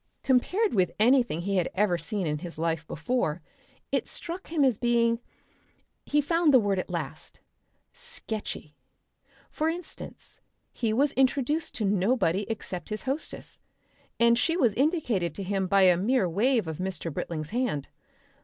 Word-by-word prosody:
Compared 365 - +2
with 185 -4 +3
anything 235 - +3
he 195 +2 -1
had 180 - +1
ever 195 -2 +2
seen 200 +2 -2
in 150 -1 -1
his 170 0 -8
life 165 0 -1
before 165 -2 -1 0.5
it - - 0
struck 350 +2 -6
him 315 -3 +1
as 250 -6 +2
being 235 -1 +2 0.9
he 295 +1 +3
found 330 +2 +3
the 260 - +7
word 200 -3 +1
at - - -4
last - - -5 0.5
sketchy. 220 - -6 0.8
For 310 +1 0
instance, 340 0 -8 0.3
he 230 -3 -1
was 275 +6 +3
introduced 275 +4 +1
to 215 - -1
nobody 200 -1 +1
except 195 -5 -5
his 215 0 -4
hostess, 275 +4 -4 0.6
and 235 0 +5
she 330 +6 +2
was 240 - +3
indicated 245 - 0
to 200 - -4
him 190 0 -1
by 195 0 +4
a 180 -2 +6
mere 210 +2 +2
wave 225 +5 +2
of 160 0 -5
Mr. 180 -4 -3
Britling's 155 0 -4
hand. 230 - -1
220 Hz, 155 wpm, -27 LUFS, 180-265 Hz, 0.9 s, the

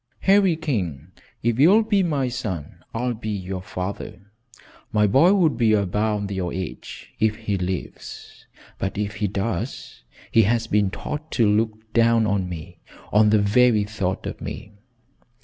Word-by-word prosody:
"Harry 195 -3 +4
King, 105 - -3 0.3
if 120 +1 +1
you'll 195 +10 +6
be 205 -2 +2
my 145 -7 0
son, 105 - -5
I'll 125 +2 -1
be 110 -1 -6
your 95 -2 -4
father. 90 0 -6 0.7
My 105 -2 +3
boy 135 - +5
would 160 - +2
be 115 -3 +3
about 105 +1 0
your 95 -3 -2
age 95 -1 -7
if 110 0 +2
he 110 -2 -3
lives, 90 -1 -6 0.3
but 95 +1 -3
if 105 0 -3
he 105 - 0
does, 100 +4 -4 0.3
he 115 - +6
has 115 +2 +1
been 105 -1 +2
taught 150 +10 -6
to 115 -4 +3
look 110 +1 -1
down 115 -1 +4
on 100 -3 0
me 85 0 -8 0.3
on 105 +1 +5
the 110 - +5
very 110 +1 +4
thought 100 -3 -3
of - - -6
me." 105 0 -7
105 Hz, 155 wpm, -23 LUFS, 95-120 Hz, 0.7 s, you'll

